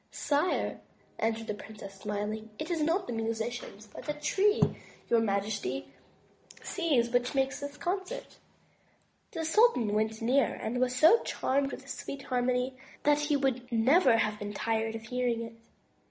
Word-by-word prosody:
"Sire," 295 +5 0 0.4
answered 225 0 0
the 210 - -2
princess, 205 -1 -10
smiling. 210 +2 -4
"It 315 +3 -4
is 330 -2 0
not 335 +5 +1
musicians, 225 -1 -3
but 210 - -11
the 295 - -1
Tree 400 +8 +2 0.5
your 235 - +6
majesty 200 - -1 0.7
sees 280 -10 +1
which 245 +3 +1
makes 270 0 +1
this 285 0 -6
concert." 380 +7 -4 0.9
The 325 -2 -2
sultan 320 - +4
went 220 +1 0
nearer 255 +4 +2
and 240 +3 -3
was 255 0 +1
so 320 - +6
charmed 275 +1 0
with - - -7
the - - -18
sweet 275 -1 -6
harmony 250 +1 0 0.3
that 295 0 +4
he 295 0 +1
would 255 -2 -1
never 250 +3 +5
have 215 -1 0
been 205 0 -5
tired 225 +1 -1
of 225 - -6
hearing 240 0 -1
it. 230 0 -8
245 Hz, 155 wpm, -30 LUFS, 220-290 Hz, 0.9 s, your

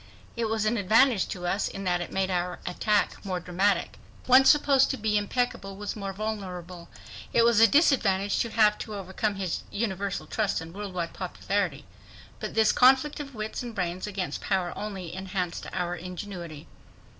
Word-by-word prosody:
It 235 -1 -1
was 220 -1 0
an 225 +2 +1
advantage 220 +2 +4
to 180 -2 -6
us 195 +3 0
in 195 - -6
that 175 -1 0
it 175 - -6
made 190 0 0
our 180 0 -1
attack 205 +3 0
more 185 -3 -2
dramatic. 180 - 0 0.3
One 260 +1 +7
supposed 280 -2 +5
to 265 - -2
be 215 -2 0
impeccable 210 -1 -1
was 205 0 -4
more 200 -2 -4
vulnerable. 185 -4 -6 0.4
It 230 - +5
was 235 -2 +4
a 225 - +8
disadvantage 210 - +3
to 235 - 0
have 215 -2 +3
to 215 - -6
overcome 195 +2 -2
this 185 -4 -2
universal 200 -2 -2
trust 210 -3 -1
and 165 +1 -9
world 200 -1 -6
wide 170 -2 -3
popularity. 185 -4 -2 0.5
But - - -5
this 220 -1 +5
conflict 265 +4 +4
of 275 -3 -7
wits 215 0 -4
and 240 -2 -7
brains 180 +1 -2
against 190 -7 -4
power 185 -3 -1
only 195 -5 -6
enhanced 185 -2 -4
our 175 0 -2
ingenuity. 175 -3 -7
200 Hz, 175 wpm, -27 LUFS, 180-220 Hz, 0.5 s, a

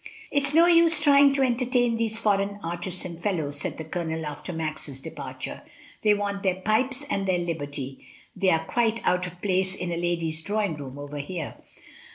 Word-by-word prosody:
"It 285 -1 +2
is 280 - -2
no 335 +1 +8
use 335 -2 +6
trying 285 -1 +6
to 275 -1 +2
entertain 245 -1 +2
these 225 -1 -1
foreign 205 -2 +1
artists 175 +2 -4
and 170 -1 -7
fellows," 155 -8 0
said - - -3
the 160 - -5
Colonel 160 -1 -3
after 150 +3 -5
Max's 155 -4 -4
departure. - - -7 0.4
"They 210 -1 +4
want 200 -1 -2
their 190 -2 +1
pipes 250 +8 0
arid 200 -5 -1
their 185 -1 +2
liberty; 145 -6 -4 0.3
they 190 0 +2
are 160 -2 +2
quite 230 +1 +1
but 180 0 +2
of 175 0 -11
place 190 -1 +1
in 180 -2 -4
a 170 - -2
lady's 170 -2 0
drawing 205 -2 -1
room 140 -2 -8
over 145 0 -6
here."' 155 +2 -4
"M. - - -23
185 Hz, 195 wpm, -26 LUFS, 160-225 Hz, 0.4 s, no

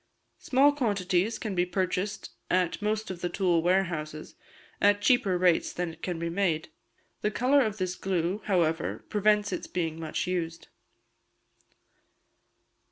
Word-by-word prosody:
Small 275 +2 +4
quantities 205 -6 0
can 215 -3 -4
be 175 -1 +2
purchased 185 +2 -2 0.2
at 180 0 +1
most 215 0 -1
of 175 -2 -8
the 175 - -1
tool 175 -2 +2
warehouses, 165 -4 -1 0.5
at 205 0 +5
cheaper 205 -4 +3
rates 175 -2 +3
than 175 -2 -3
it 165 - -18
can 180 -2 -3
be 170 +1 -3
made. 170 - 0 0.5
The 210 - +1
colour 255 +6 +3
of 215 -4 -1
this 185 -2 -2
glue, 185 +1 -1
however, 165 -5 0
prevents 210 0 +2
its - - -4
being 165 -2 -3
much 160 -1 -3
used. 170 -2 -3
185 Hz, 140 wpm, -28 LUFS, 170-210 Hz, 0.5 s, at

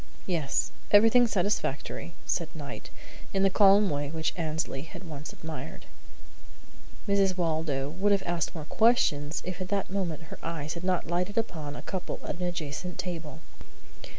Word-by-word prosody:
"Yes. 160 -7 0 0.2
Everything 225 +4 +7
satisfactory," 180 -5 -1
said 165 -2 0
Knight, 145 -4 -7 0.5
in 195 - +3
the 195 - +5
calm 200 +1 +7
way 145 0 -1
which 160 +1 -1
Annesley 160 -4 -2
had 170 +4 -9
once 150 -4 -7
admired. 160 -2 -7 1.2
Mrs. 195 -2 +3
Waldo 155 -5 0
would 190 +7 +1
have 200 -1 +3
asked 170 -2 -1
more 155 -2 -5
questions 155 -10 +3
if 185 0 -4
at 185 - -2
that 195 -1 -1
moment 175 -6 -2
her - - -9
eyes 155 -2 -3
had 170 - -7
not 185 -1 +1
lighted 180 +5 -1
upon 160 -10 -2
a - - -7
couple 190 -3 -4
at - - -3
an 180 - 0
adjacent 175 +1 -4
table. 165 -4 -5
170 Hz, 155 wpm, -29 LUFS, 155-195 Hz, 1.2 s, Everything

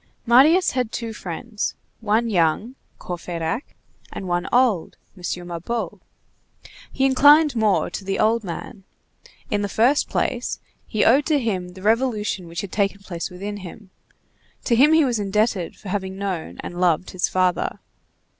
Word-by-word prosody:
Marius 290 +10 +5
had 250 -3 -1
two 230 -2 -4
friends: 210 +4 -4 0.2
one 225 +1 +1
young, 190 +4 +1 0.2
Courfeyrac; 175 - -4 0.4
and 190 - -6
one 175 0 -1
old, 240 -9 +2 0.2
M. 185 - -15 0.3
Mabeuf. 175 +7 -4 0.9
He 270 - +1
inclined 290 +2 +6
more 215 -3 +2
to - - -5
the 195 0 -2
old 225 +1 +2
man. 195 +3 -7 0.7
In 205 - +1
the 205 - -2
first 245 +8 +2
place, - - -1 0.3
he 215 - +1
owed 270 +5 +4
to 310 -2 +3
him 190 -8 -2
the 185 +1 -12
revolution 215 -5 0
which 170 +1 -4
had 200 - -7
taken 200 -1 0
place 175 -3 -5
within 200 +3 -6
him; 190 +1 -11 0.7
to 235 - +2
him 285 +6 +6
he 320 -2 +5
was 240 -4 0
indebted 205 -2 0
for 200 - -10
having 190 -1 -3
known 190 -5 -4
and 175 +1 -6
loved 175 0 +2
his 185 - -1
father. 185 -1 0
205 Hz, 155 wpm, -22 LUFS, 185-235 Hz, 0.9 s, inclined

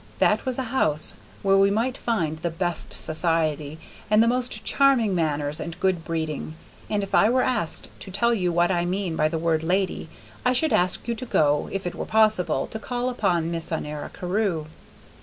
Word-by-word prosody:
That - - +2
was 255 - +1
a 265 - -1
house 155 - +1 0.3
where 195 -1 +4
one 195 +1 +4
might 245 +4 0
find 165 - -1
the 170 +1 -1
best 170 0 -2
society, 155 -2 0 0.3
and 215 +1 +5
the - - +2
most 245 -2 -1
charming 260 -7 +3
manners 150 -3 -1
and 170 0 -6
good 185 -3 +1
breeding, 160 -1 -3 0.3
and 205 -1 0
if 195 - -7
I 210 - +5
were 255 +1 +3
asked 240 -11 -1
to - - -9
tell 235 +5 +2
you 180 -6 0
what 175 +2 +2
I 175 -2 +1
mean 180 -1 -2
by 155 - +2
the 165 +1 -2
word 160 -1 +1
"lady," 185 +3 -1 0.3
I 250 - +3
should 310 +5 +2
ask 180 +5 +1
you 235 - 0
to 255 +3 -5
go, 145 -7 +2
if 195 -1 -3
it 175 - -2
were - - -5
possible, 215 -10 +2
to 220 - -4
call 245 +2 -2
upon 175 -9 0
Miss 165 0 -4
Honora 150 -2 -4
Carew. 180 -3 -1
180 Hz, 195 wpm, -24 LUFS, 160-220 Hz, 0.3 s, and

